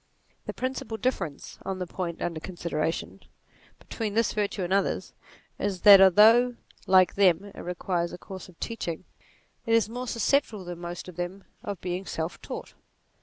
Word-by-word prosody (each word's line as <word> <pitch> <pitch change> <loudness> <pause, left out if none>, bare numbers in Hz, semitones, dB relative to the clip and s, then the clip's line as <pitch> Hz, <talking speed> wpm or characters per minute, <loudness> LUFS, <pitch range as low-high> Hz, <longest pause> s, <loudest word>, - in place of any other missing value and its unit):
The - - -3
principal 255 -3 -4
difference, 220 - -3
on 190 -1 -3
the 185 - -3
point 170 -1 -4
under 170 -2 -2
consideration, 165 -2 -3 0.6
between 215 -3 -5
this 230 -1 +2
virtue 205 -2 -1
and 180 +2 -1
others, 200 0 0 0.5
is 195 -3 -2
that 200 -2 +10
although, 225 +6 +6 0.3
like 185 -1 +5
them, 195 0 +3
it - - -11
requires 175 -1 -2
a - - -7
course 190 0 -10
of 175 - -19
teach 230 -5 -4
NATURE 165 -2 -4 0.6
51 - - -31
ing, 225 - +2
it - - +7
is 220 -1 +1
more 250 +2 -5
susceptible 230 -4 0
than 175 -1 -7
most 175 +1 -6
of 180 -2 -11
them 180 +2 -4 0.2
of 200 -2 -5
being 180 +1 -4
self 160 +1 -4
taught. - - -7
190 Hz, 175 wpm, -27 LUFS, 175-215 Hz, 0.6 s, that